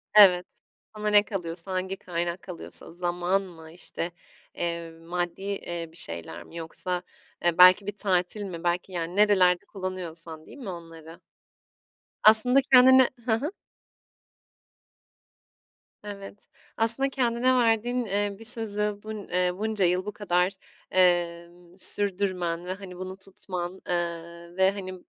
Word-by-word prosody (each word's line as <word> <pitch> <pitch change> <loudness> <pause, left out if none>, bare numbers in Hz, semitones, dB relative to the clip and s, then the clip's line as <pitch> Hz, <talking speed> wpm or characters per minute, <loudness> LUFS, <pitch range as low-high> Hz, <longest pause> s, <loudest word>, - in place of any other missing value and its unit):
Evet, 180 -4 +8 0.5
sana 210 0 -4
ne 205 0 +6
kalıyorsa, 180 -2 -4
hangi 190 +1 -2
kaynak 175 0 -3
kalıyorsa 180 -2 -6
zaman 175 +2 0
mı 165 -4 -12
işte, 175 0 -5 0.4
eee, 170 -1 -3
maddi, 170 +2 -4
eee, 175 -4 -4
bir 165 - -16
şeyler 85 - -6
mi 165 - -16
yoksa, 175 +2 -3 0.4
eee, 175 -1 +2
belki 185 +2 +8
bir 205 0 -4
tatil 190 +1 0
mi, 175 -3 -7
belki 175 +2 -1
yani 175 0 -4
nerelerde 190 -4 +4
kullanıyorsan 170 -4 -6
değil - - -13
mi 240 -8 -7
onları? 165 -1 -10 1.0
Aslında 235 +5 +7
kendine 260 0 +8
Hı 235 - 0
hı. 275 +8 -2 2.5
Evet, 200 0 -9 0.3
aslında 230 +4 +3
kendine 255 -1 +1
verdiğin, 240 0 +2
ııı, 200 0 -1
bir 225 - -11
sözü 210 -3 0
bun 215 -1 -7
eee, 180 0 +2
bunca 215 -2 0
yıl 180 +2 +1
bu 210 - -3
kadar, 180 -2 +1 0.4
emm, 175 -1 0
sürdürmen 185 -4 -1
ve 185 - -3
hani, 190 -2 -9
bunu 185 +1 -6
tutman, 190 -1 -7
ııı, 170 0 -4
ve 190 0 +4
hani, 190 -2 -6
185 Hz, 130 wpm, -26 LUFS, 175-205 Hz, 2.5 s, Evet